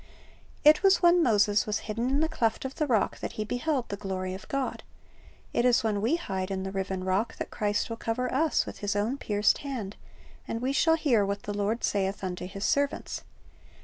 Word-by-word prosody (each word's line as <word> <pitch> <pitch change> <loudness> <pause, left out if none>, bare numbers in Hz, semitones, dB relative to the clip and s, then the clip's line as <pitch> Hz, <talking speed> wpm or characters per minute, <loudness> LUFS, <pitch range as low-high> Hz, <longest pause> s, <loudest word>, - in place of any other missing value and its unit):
"^ - - -23 0.6
It 300 +1 +7
was 385 -2 +4
when 345 0 +6
Moses 205 -6 +3
was 210 -1 -1
hidden 230 +3 -1
in 275 +3 +1
the 320 - +2
cleft 235 -7 -1
of 265 - -4
the 305 0 -1
rock 225 -6 +1
that - - -5
he 215 - -3
beheld 245 +2 -1
the 200 - -2
glory 190 -2 -4
of 190 0 -9
God. 275 -1 -2 0.7
It - - +2
is 245 -2 +4
when 210 -2 0
we 235 +10 +2
hide 190 - -3
in 190 -1 -3
the 190 - -4
riven 190 -1 -3
Rock 190 +5 0
that - - -5
Christ 205 -1 0
will 230 - -5
cover 250 +3 -2
us 310 +3 +2
with - - -8
His 205 0 -1
own 225 +7 0
pierced 210 -2 +2
hand, 240 -8 -5 0.5
and 225 - -3
we 260 +3 -1
shall 325 +3 +4
hear 265 -10 +2
what 200 +1 -2
the 205 - -4
Lord 205 +3 -1
saith 195 -1 0
unto 180 -1 -4
His 195 +2 -5
servants. 285 0 0
220 Hz, 215 wpm, -28 LUFS, 200-270 Hz, 0.7 s, It